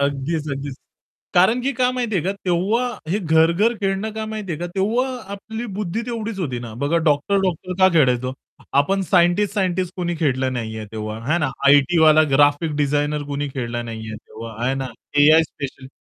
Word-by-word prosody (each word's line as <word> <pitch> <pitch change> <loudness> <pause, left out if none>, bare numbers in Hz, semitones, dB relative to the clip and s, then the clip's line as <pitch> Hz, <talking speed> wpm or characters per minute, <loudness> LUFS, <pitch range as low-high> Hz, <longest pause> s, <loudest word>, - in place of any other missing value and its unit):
अगदीच, 145 +3 -1
अगदीच. 140 0 -5 0.6
कारण 190 +7 +4
की 275 +2 0
काय 250 -2 +1
माहितीये 235 -7 -1
का 190 - 0
तेव्हा 195 +8 +1 0.2
हे 190 +5 +1
घर-घर 170 +5 +3
खेळणं 195 +2 -1
काय 220 0 -4
माहिती 215 -4 -5
आहे 155 - -4
का? 175 - -2
तेव्हा 220 +7 +1 0.3
आपली 220 +4 -6
बुद्धी 210 +1 -2
तेवढीच 225 -3 -4
होती 135 -10 -2
ना. 120 -2 -8
बघा 145 +4 +1
डॉक्टर-डॉक्टर 185 +4 +1
का 190 0 +6
खेळायचो. 130 -4 +2 0.5
आपण 195 +7 0
सायंटिस्ट-सायंटिस्ट 185 0 +2
कोणी 175 -1 -2
खेळलं 130 -4 0
नाहीये, 110 -3 -4
तेव्हा 110 0 -5
आहे 170 +3 +3
ना. 145 -5 0 0.2
आयटीवाला, 155 +3 +6
ग्राफिक 145 +3 +3
डिझाइनर 145 +1 0
कुणी 145 0 -2
खेळला 120 -2 -3
नाहीये 110 -2 -6
तेव्हा 115 +1 -10
आहे 130 +2 +1
ना. 135 0 -3 0.3
AI 155 +3 +7
special 140 -4 -7
160 Hz, 165 wpm, -21 LUFS, 140-195 Hz, 0.6 s, AI